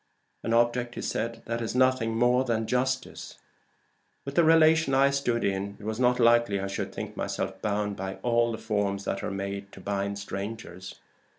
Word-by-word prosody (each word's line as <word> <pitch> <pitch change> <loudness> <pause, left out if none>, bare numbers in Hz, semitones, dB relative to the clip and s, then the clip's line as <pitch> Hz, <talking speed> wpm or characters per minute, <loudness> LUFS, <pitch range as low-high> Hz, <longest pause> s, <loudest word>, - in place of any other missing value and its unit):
"An - - -3
object 120 +1 +2
that 115 0 -3
is 115 +1 -3
nothing 130 -3 +2
more 125 +2 +3
than 115 -3 -1
justice. 130 +2 -2 0.9
With 140 - -5
the 170 - +4
relation 160 -3 +5
I 135 +1 +5
stood 125 -4 0
in, 100 +1 -2
it - - -13
was 110 +2 -3
not 125 0 +3
likely 120 -4 +4
I 95 - -3
should 95 -1 -4
think - - -6
myself - - -3
bound 105 -1 -1
by 95 0 -4
all 120 -1 +2
the 110 - -4
forms 105 -3 -1
that 100 - -2
are - - -2
made 100 0 -5
to - - -11
bind 100 +1 -2
strangers. 100 -2 -6
115 Hz, 175 wpm, -27 LUFS, 100-125 Hz, 0.9 s, relation